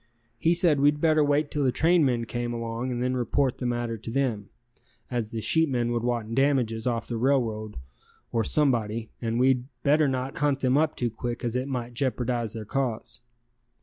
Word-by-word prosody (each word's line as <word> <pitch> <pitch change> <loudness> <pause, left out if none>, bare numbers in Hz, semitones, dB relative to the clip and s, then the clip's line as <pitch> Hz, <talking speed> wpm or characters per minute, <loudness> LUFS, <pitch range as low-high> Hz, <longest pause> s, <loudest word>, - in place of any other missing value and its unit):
He 165 +5 +3
said 170 -5 +3
we'd 145 +1 +3
better 155 -1 +4
wait 145 +1 +1
till 145 - 0
the 130 - +3
trainmen 140 -5 +2
came 120 +1 -3
along 115 +2 -3
and 120 0 -2
then 125 0 0
report 130 +1 0
the 125 - -2
matter 120 -1 -2
to 115 - -8
them, 115 -5 -1 0.6
as 120 -3 -2
the 115 -1 -4
sheepmen 130 -5 +2
would 120 -1 0
want 120 -2 -2
damages 125 -4 +1
off 115 -3 -1
the 120 - -3
railroad 115 -4 0 0.5
or 115 -1 +1
somebody 115 -6 0
and 115 0 -1
we'd 130 -1 +3 0.2
better 150 +1 +4
not 130 0 -2
hunt 145 -2 +1
them 130 0 +2
up 155 +1 +2
too 120 -2 -1
quick 120 +2 -5
as 120 0 -2
it 130 +1 -1
might 125 -3 -4
jeopardize 120 -3 -1
their 110 -1 -6
case. 120 -1 -3
125 Hz, 185 wpm, -26 LUFS, 115-140 Hz, 0.6 s, better